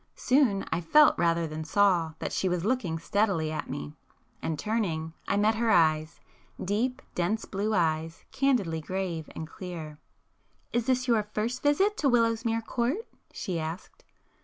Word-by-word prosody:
Soon 250 -7 +2
I - - 0
felt, 300 - +6
rather 170 0 +2
than 155 0 -5
saw, 175 -2 +2
that - - -4
she 190 - 0
was 180 0 -1
looking 215 -9 0
steadily 170 -2 0
at 155 - -4
me,—and 150 +2 -7
turning, 165 -8 -2
I - - +1
met 210 +2 +3
her 230 +1 0
eyes,—deep 180 +7 0
dense 180 +6 -1
blue 210 +2 -1
eyes, 160 -1 0
candidly 245 -13 +1
grave 175 -2 -3
and 160 - -5
clear. 160 -4 -8 0.7
"Is 235 -1 0
this 255 0 +1
your 230 -3 +4
first 235 +4 -1
visit 385 +9 +2
to 280 - +2
Willowsmere 230 -1 +2
Court?" 255 - -1 0.2
she 175 -3 -3
asked. 160 +5 -6
195 Hz, 145 wpm, -28 LUFS, 160-230 Hz, 0.7 s, felt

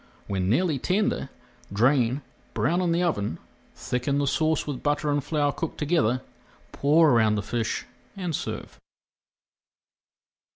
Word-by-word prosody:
When 95 -2 -1
nearly 150 - +2
tender, 200 - 0 0.4
drain, 125 +4 +2 0.3
brown 170 +7 +1
in 175 -2 +1
the 170 +2 +2
oven, 100 - -1 0.4
thicken 125 +3 -1
the 145 - +1
sauce 155 +2 +1
with 140 -4 -4
butter 145 +1 0
and 145 -1 0
flour 145 -1 +1
cooked 165 +2 -5
together, 130 -6 +1 0.5
pour 155 +2 +4
around 110 -3 +4
the 105 - -2
fish 120 -2 -2 0.3
and 180 -5 -2
serve. - - -6
145 Hz, 130 wpm, -26 LUFS, 120-160 Hz, 0.5 s, pour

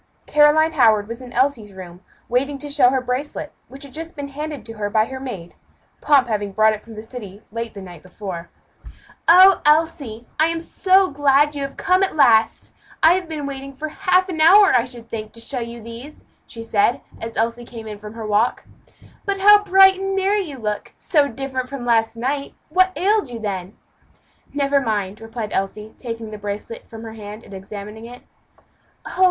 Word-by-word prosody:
Caroline 300 +2 +4
Howard 220 -8 +3
was 230 +2 -7
in 250 -1 -10
Elsie's 245 -6 0
room, 180 -1 -11 0.3
waiting 275 +4 0
to 290 +1 -6
show 275 -4 +5
her 260 0 0
bracelet, 255 +4 -4 0.2
which 270 +3 -11
had 275 -2 -12
just 325 +2 -7
been 285 -1 -6
handed 295 0 -6
to 225 - -7
her 205 -1 -1
by 215 +1 +2
her 260 +2 -7
maid; 195 -11 -7 0.5
Pomp 275 -4 +4
having 205 -3 -2
brought 215 +1 +4
it 215 - -6
from 225 -1 -12
the 215 - -8
city 215 -4 -10
late 230 0 -5
the 200 - -8
night 175 -4 -11
before. 185 -2 -8 0.8
"Oh! 370 +2 +8
Elsie, 295 -7 +1
I 315 - +5
am 330 0 -2
so 375 +3 +2
glad 290 +1 +3
you 285 - -5
have 275 0 -5
come 365 +1 +2
at 390 - 0
last. 225 -6 +3 0.3
I 320 +2 +8
have 360 -2 -2
been 305 -3 -4
waiting 275 0 -6
for 310 +3 -5
half 370 +2 +2
an 330 -4 -3
hour, 390 +5 +7
I 245 -2 +3
should 240 -3 -9
think, 215 -1 -6
to 230 - -10
show 245 +3 -3
you 235 -1 -7
these," 235 +6 -11 0.2
she 230 - -8
said, 225 +1 +1 0.2
as 225 0 -6
Elsie 230 +2 -1
came 230 -2 -10
in 210 -1 -8
from 210 0 -10
her 225 -1 -6
walk. 215 +3 +1 0.6
"But 400 0 -1
how 410 +1 +7
bright 385 -1 +6
and 390 0 -2
merry 395 +2 +1
you 300 -8 -7
look; 210 -3 -4
so 295 -5 +2
different 260 0 -4
from 270 -2 -6
last 225 -1 +2
night! 275 +4 -3
what 370 +3 +3
ailed 410 - +1
you 240 - -6
then?" 195 -3 -5 0.7
"Never 280 -1 +1
mind," 210 -4 -2
replied 225 -1 -6
Elsie, 210 +3 -3
taking 230 -3 -6
the 210 - -8
bracelet 205 +3 -6
from 225 0 -10
her 225 -1 -8
hand, 210 0 -9
and 200 - -13
examining 205 +3 -8
it. 245 +1 -12 0.8
"Oh! - - -8
245 Hz, 200 wpm, -21 LUFS, 220-300 Hz, 0.8 s, Oh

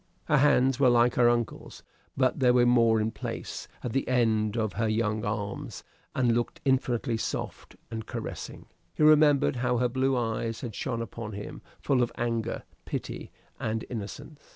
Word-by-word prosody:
Her 150 - +3
hands 135 -2 +4
were 130 -2 +5
like 120 0 +4
her 120 -1 +4
uncle's; 120 -2 -3 0.3
but 130 +1 +2
they 130 -2 +4
were 125 0 +5
more 115 -2 +4
in 110 +1 0
place - - -6 0.2
at 120 - -3
the 135 - 0
end 110 -3 +1
of 110 -4 -1
her 110 +3 0
young 110 -1 0
arms, 105 -1 -4 0.3
and 125 -3 +3
looked 120 0 -1
infinitely 125 -3 +1
soft - - -5 0.2
and 110 -1 -5
caressing. - - -6 0.3
He - - +1
remembered 150 -4 +5
how 125 0 +1
her 125 +1 +1
blue 130 +1 +1
eyes 115 -1 -2
had 120 -3 -5
shone 115 +3 -3
upon 110 0 -7
him, 100 +1 -7 0.2
full 135 -3 +1
of 120 - +1
anger, 115 -1 -2 0.2
pity, - - -5 0.3
and 110 0 -2
innocence. 140 +7 -7
120 Hz, 170 wpm, -28 LUFS, 110-130 Hz, 0.3 s, were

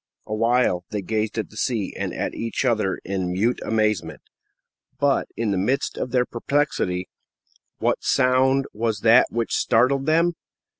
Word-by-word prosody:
Awhile, 115 -4 +1
they 105 -2 -4
gazed 110 +2 -2
at 110 - -3
the - - -16
sea 110 -4 -1
and - - -3
at - - -3
each 115 +4 -3
other 110 -6 +1
in 95 -1 -2
mute 110 +7 0
amazement. 105 -9 -1 0.8
But 140 0 +2
in 115 -2 0
the 95 - 0
midst 130 +9 0
of - - -3
their 125 0 +2
perplexity, 120 -9 -1 0.7
what - - 0
sound 130 +1 +3
was 110 -1 -2
that 115 +2 +6
which 115 0 -2
startled 135 +4 +2
them? 165 +2 +3
115 Hz, 150 wpm, -23 LUFS, 105-130 Hz, 0.8 s, that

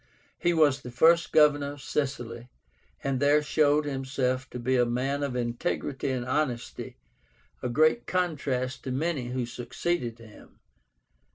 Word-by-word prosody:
He 175 - +2
was 150 -5 +3
the 125 - -8
first 165 +8 +4
Governor 145 -2 +4
of 145 - -12
Sicily, 125 -4 -3 0.5
and 135 -2 0
there 145 +2 +4
showed 150 0 +3
himself 130 -2 -2
to - - -7
be 125 +2 0
a 125 - +4
man 130 +4 -1
of 140 -3 -2
integrity 120 +3 -2
and 125 -2 -2
honesty, 130 -3 -2 0.6
a 125 - -2
great 155 - +3
contrast 140 -8 -1
to 130 - -3
many 140 -1 -1
who 125 0 -2
succeeded 120 +1 -3
him.) 115 -2 -16
135 Hz, 145 wpm, -28 LUFS, 125-150 Hz, 0.6 s, first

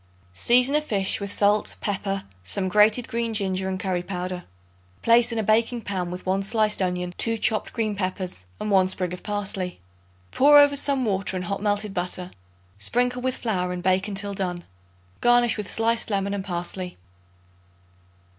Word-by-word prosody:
Season 245 - +4
a 300 - +3
fish 200 -9 0
with 200 0 -4
salt, 205 +1 +1
pepper, 195 -1 -2 0.2
some 185 - -1
grated 210 +5 +4
green 230 -1 -2
ginger 190 -2 -1
and 185 0 -3
curry 185 -2 -1
powder. 180 -1 -5 0.6
Place 235 +1 +5
in 230 - -3
a 220 - 0
baking 230 +3 +2
pan 185 -4 -3
with 180 +1 -7
1 190 +1 +1
sliced 215 0 +1
onion, 180 -1 -2
2 230 -1 +1
chopped 215 0 -1
green 215 -3 -2
peppers 185 - -4 0.2
and 210 - -3
1 190 -1 +5
sprig 185 -1 -2
of 180 - -7
parsley. 195 -3 -3 0.5
Pour 290 +2 +6
over 285 0 +6
some 275 -2 +2
water 190 -2 -1
and 180 - -4
hot 200 +2 -3
melted 205 -1 -1
butter; 180 0 -3 0.5
sprinkle 245 - +1
with 255 0 -1
flour 180 -6 -1
and 180 -1 -5
bake 190 +2 +2
until 200 0 -2
done. 180 -3 -3 0.6
Garnish 240 -1 +4
with 210 -2 -5
sliced 230 +1 +1
lemon 200 -1 -1
and 200 -1 -3
parsley. 180 0 -5
200 Hz, 170 wpm, -24 LUFS, 185-225 Hz, 0.6 s, Pour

